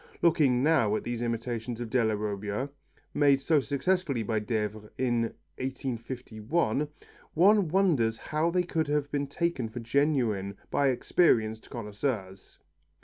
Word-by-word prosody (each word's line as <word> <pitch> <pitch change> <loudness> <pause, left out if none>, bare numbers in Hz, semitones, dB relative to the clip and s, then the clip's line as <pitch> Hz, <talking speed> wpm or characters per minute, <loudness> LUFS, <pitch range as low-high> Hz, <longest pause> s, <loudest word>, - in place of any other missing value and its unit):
Looking 140 -7 +4
now 135 -9 +3
at - - -2
these 120 -1 -3
imitations 115 0 -3
of 120 -2 -5
Della 110 -4 +2
Robbia, 105 +4 -3 0.4
made 140 -2 +4
so 155 +2 +3
successfully 140 -2 0
by 110 0 0
Devers 105 -1 -3
in 120 -2 +1 0.4
1851, 130 +1 -2 0.5
one 195 +3 +5
wonders 155 - +2
how 155 +6 -1
they 180 +1 +1
could 160 -2 -1
have 145 -1 0
been 145 -1 -1
taken 140 -5 -1
for 110 - -6
genuine 115 -6 0
by 140 - +2
experienced 115 -4 +2
connoisseurs. 105 -3 -4
125 Hz, 130 wpm, -29 LUFS, 110-150 Hz, 0.5 s, one